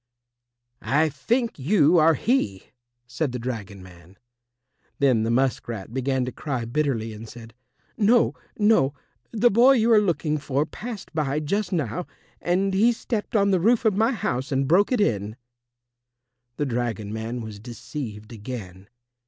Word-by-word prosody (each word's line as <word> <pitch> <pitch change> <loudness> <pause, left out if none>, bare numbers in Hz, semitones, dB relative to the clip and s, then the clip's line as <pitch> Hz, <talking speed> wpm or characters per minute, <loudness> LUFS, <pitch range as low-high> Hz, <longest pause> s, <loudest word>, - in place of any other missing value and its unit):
"I 155 +3 +2
think 230 - -1
you 160 +2 +4
are 160 +1 +5
he," 140 - -1 0.3
said 125 +2 -3
the - - -2
dragon 110 -6 -6
man. 90 +1 -16 0.8
Then 130 -5 +3
the 110 - -1
musk 130 +2 +1
rat 110 -2 -6
began 130 0 0
to 125 - -4
cry 130 -3 -4
bitterly 120 -4 -1
and 110 +1 -10
said, 115 -1 -12 0.4
"No, 230 +2 +4 0.2
no; 205 -10 +3 0.3
the 235 +2 +3
boy 245 +6 +6
you 235 -2 +3
are 215 - +6
looking 155 -5 0
for 140 +1 -1
passed 215 +2 -8
by 150 -2 0
just 200 +8 -2
now, 165 - -2 0.3
and 190 +3 +1
he 220 +5 +4
stepped 225 -1 -4
on 200 -1 +3
the 185 - +3
roof 230 +6 +2
of 215 -3 +3
my 225 +4 +3
house 135 - -2
and 135 0 +1
broke 185 - +3
it 250 - +2
in." 105 - 0 1.2
The 145 - 0
dragon 115 -5 -3
man 115 +2 -4
was 110 -2 -8
deceived 115 -1 -7
again. 100 -4 -8
140 Hz, 155 wpm, -24 LUFS, -, 1.2 s, boy